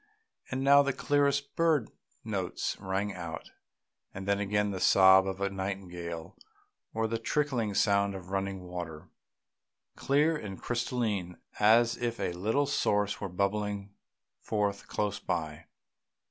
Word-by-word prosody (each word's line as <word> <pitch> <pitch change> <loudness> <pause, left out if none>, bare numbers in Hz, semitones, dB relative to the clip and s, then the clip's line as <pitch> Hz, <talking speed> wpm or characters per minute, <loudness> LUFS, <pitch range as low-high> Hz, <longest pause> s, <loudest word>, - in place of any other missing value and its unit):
And 130 0 -2
now 140 +1 +7
the 140 -1 0
clearest 140 0 +1
bird 160 -8 +2 0.3
notes 95 -5 -2
rang 95 +1 -2
out, 85 -3 -7 0.6
and 95 +1 -6
then 100 0 +2
again 105 0 0
the 95 - -4
sob 95 0 +6
of 95 0 -3
a 100 0 -1
nightingale 90 -4 -5 0.6
or 110 0 -1
the 115 +1 -2
trickling 120 -5 -1
sound 100 -1 +2
of 95 -1 -9
running 95 -1 -2
water, 85 -4 -7 0.9
clear 150 +4 +2
and 105 -9 -6
crystalline, 115 -7 -2 0.2
as 115 +3 +5
if 120 -1 -3
a 90 - -1
little 110 +11 +1
source 105 -7 0
were 100 - -3
bubbling 100 +1 -2 0.5
forth 105 -2 -2
close 105 -1 -2
by. 80 -2 -3
100 Hz, 130 wpm, -30 LUFS, 95-115 Hz, 0.9 s, now